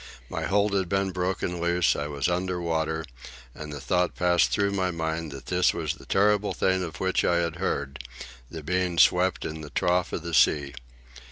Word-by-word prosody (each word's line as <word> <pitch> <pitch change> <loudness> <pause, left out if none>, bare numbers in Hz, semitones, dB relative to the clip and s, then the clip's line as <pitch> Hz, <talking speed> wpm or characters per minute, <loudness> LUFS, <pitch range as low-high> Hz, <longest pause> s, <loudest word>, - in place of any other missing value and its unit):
My - - -3
hold 100 +1 +2
had 95 -3 0
been 95 0 0
broken 90 -1 -2
loose, 85 0 +2
I 75 - -3
was 70 -2 -1
under 90 +1 -1
water, 80 -1 -1 0.5
and 75 +1 -8
the 70 - -6
thought 90 +6 0
passed 90 -1 +3
through 100 0 +1
my 95 -2 0
mind 80 -2 -3
that 70 -1 -9
this 90 0 +2
was 80 -2 -2
the 85 - -15
terrible 105 +1 +2
thing 95 -1 +1
of 85 - -7
which 95 0 +1
I 90 - +2
had 85 -1 -1
heard, 70 -7 -3 0.5
the 80 -2 -8
being 90 +1 -1
swept 90 +2 +4
in 80 0 -5
the 75 - -8
trough 90 +6 +1
of 80 - -4
the 85 0 -5
sea. 70 -3 +3
85 Hz, 195 wpm, -26 LUFS, 80-90 Hz, 0.5 s, swept